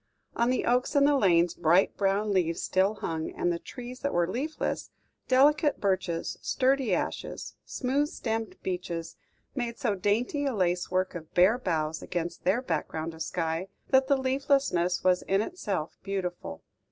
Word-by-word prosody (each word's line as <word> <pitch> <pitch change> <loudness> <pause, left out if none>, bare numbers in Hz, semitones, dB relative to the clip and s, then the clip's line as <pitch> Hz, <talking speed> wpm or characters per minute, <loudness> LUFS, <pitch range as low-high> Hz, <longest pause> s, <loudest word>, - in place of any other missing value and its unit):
On 235 +1 +2
the 255 - +1
oaks 250 +4 +1
in 280 0 +6
the 290 0 +4
lanes 175 -7 +4
bright 175 +3 +3
brown 200 +1 +1
leaves 170 -3 +1
still 190 +3 +2
hung; 160 -5 -3
and 175 - +1
the 170 - -3
trees 250 +4 -9
that 280 - -2
were 175 -1 +3
leafless 280 - -3 0.4
delicate 290 +3 +4
birches, 185 -4 -1
sturdy 265 -3 +1
ashes, 180 - -3
smooth 275 +3 0
stemmed 225 -6 -3
beeches, 175 -3 -4 0.4
made 240 -3 -3
so 230 -5 0
dainty 215 +9 0
a 270 -4 0
lacework 185 0 0
of 160 -3 -8
bare 190 +7 +5
boughs 160 -7 -1
against 175 -1 -4
their 205 +8 +2
background 160 - -3
of 160 - -10
sky, 165 +2 -2 0.2
that 265 0 +5
the 280 - +4
leaflessness 265 - +1
was 180 -1 +3
in 195 +1 +1
itself 200 - -3
beautiful. 180 - -4
195 Hz, 155 wpm, -28 LUFS, 175-255 Hz, 0.4 s, in